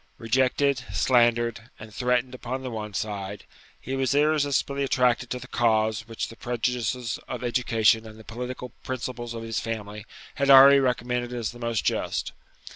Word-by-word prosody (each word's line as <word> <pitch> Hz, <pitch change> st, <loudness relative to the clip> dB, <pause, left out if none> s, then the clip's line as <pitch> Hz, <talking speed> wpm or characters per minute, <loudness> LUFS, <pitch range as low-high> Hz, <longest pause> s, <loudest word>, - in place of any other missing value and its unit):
Rejected, 130 Hz, +3 st, +1 dB
slandered, 120 Hz, -2 st, +2 dB
and 110 Hz, -1 st, -11 dB
threatened 125 Hz, +1 st, 0 dB
upon 130 Hz, +1 st, -5 dB
the 130 Hz, -, -5 dB
one 105 Hz, -2 st, -6 dB
side, 100 Hz, 0 st, -4 dB, 0.4 s
he 130 Hz, -, -5 dB
was 135 Hz, 0 st, 0 dB
irresistibly 145 Hz, -2 st, +1 dB
attracted 125 Hz, -2 st, +1 dB
to 125 Hz, -, -3 dB
the 125 Hz, 0 st, -10 dB
cause 110 Hz, -2 st, +1 dB
which 115 Hz, -1 st, -4 dB
the 115 Hz, -, -11 dB
prejudices 120 Hz, 0 st, -2 dB
of 125 Hz, -1 st, -5 dB
education 115 Hz, -2 st, +2 dB
and 110 Hz, 0 st, -12 dB
the 110 Hz, -, -13 dB
political 125 Hz, +3 st, -6 dB
principles 120 Hz, -2 st, -5 dB
of 115 Hz, -, -6 dB
his 115 Hz, -2 st, -2 dB
family 105 Hz, -1 st, -6 dB, 0.3 s
had 140 Hz, -, +2 dB
already 140 Hz, +1 st, +9 dB
recommended 125 Hz, -1 st, -1 dB
as 120 Hz, -3 st, -3 dB
the 120 Hz, -, -13 dB
most 115 Hz, -2 st, -2 dB
just. -, -, -1 dB
120 Hz, 160 wpm, -26 LUFS, 115-130 Hz, 0.4 s, already